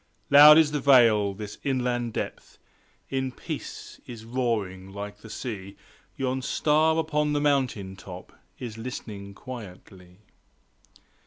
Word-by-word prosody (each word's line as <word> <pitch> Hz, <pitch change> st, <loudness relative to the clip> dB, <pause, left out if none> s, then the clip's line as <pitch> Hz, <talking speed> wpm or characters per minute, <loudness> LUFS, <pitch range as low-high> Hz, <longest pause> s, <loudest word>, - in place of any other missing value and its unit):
Loud 150 Hz, +2 st, +10 dB
is 160 Hz, -2 st, +4 dB
the 150 Hz, -, -1 dB
Vale;–this 105 Hz, -6 st, +3 dB
inland 125 Hz, -4 st, -1 dB
Depth -, -, -6 dB, 0.5 s
In 130 Hz, -1 st, -1 dB
peace -, -, -8 dB
is 115 Hz, -3 st, -9 dB
roaring 110 Hz, -6 st, -2 dB
like 100 Hz, +1 st, -7 dB
the 110 Hz, -, -13 dB
Sea 105 Hz, -4 st, -7 dB, 0.4 s
Yon 130 Hz, 0 st, -1 dB
star 155 Hz, +4 st, +2 dB
upon 150 Hz, -2 st, 0 dB
the 145 Hz, -, +1 dB
mountain 130 Hz, -10 st, 0 dB
top 90 Hz, -1 st, -11 dB, 0.2 s
Is 115 Hz, -3 st, -7 dB
listening 105 Hz, -4 st, -7 dB
quietly. 95 Hz, -7 st, -11 dB
120 Hz, 115 wpm, -26 LUFS, 100-135 Hz, 0.5 s, Loud